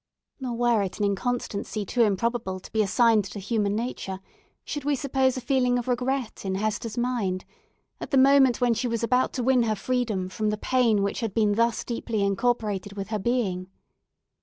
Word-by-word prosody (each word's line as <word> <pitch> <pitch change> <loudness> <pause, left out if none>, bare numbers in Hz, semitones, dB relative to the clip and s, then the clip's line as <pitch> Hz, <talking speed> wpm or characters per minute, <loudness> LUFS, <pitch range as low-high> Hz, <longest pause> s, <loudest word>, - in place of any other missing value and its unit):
Nor 250 -3 -3
were 240 -3 +3
it 195 -2 -3
an 210 - 0
inconsistency 210 0 -2
too 240 +5 0
improbable 215 -2 0
to - - -14
be 220 - +2
assigned 220 +2 +3
to 200 +2 -7
human 205 0 0
nature, 215 -5 -4 0.5
should 290 -2 -4
we 290 0 +1
suppose 265 -1 +1
a - - -3
feeling 250 0 +2
of 245 - -3
regret 250 -1 -1
in 190 -1 -2
Hester's 215 +2 -2
mind, 230 -7 -1 0.5
at - - -6
the 275 - +2
moment 265 -1 +5
when 245 -1 +3
she 245 +2 -1
was 230 -1 -2
about 250 +2 +2
to 250 - -2
win 255 0 +4
her 220 -2 +1
freedom 220 -4 -1
from 215 +3 -2
the 210 - -1
pain 230 -3 +2
which 200 - -1
had 225 -4 -3
been 210 -2 +3
thus 230 +2 +1
deeply 230 -3 -2
incorporated 205 -1 0
with 195 -1 -6
her 215 -1 -1
being. 190 -5 -1
230 Hz, 190 wpm, -26 LUFS, 205-250 Hz, 0.5 s, moment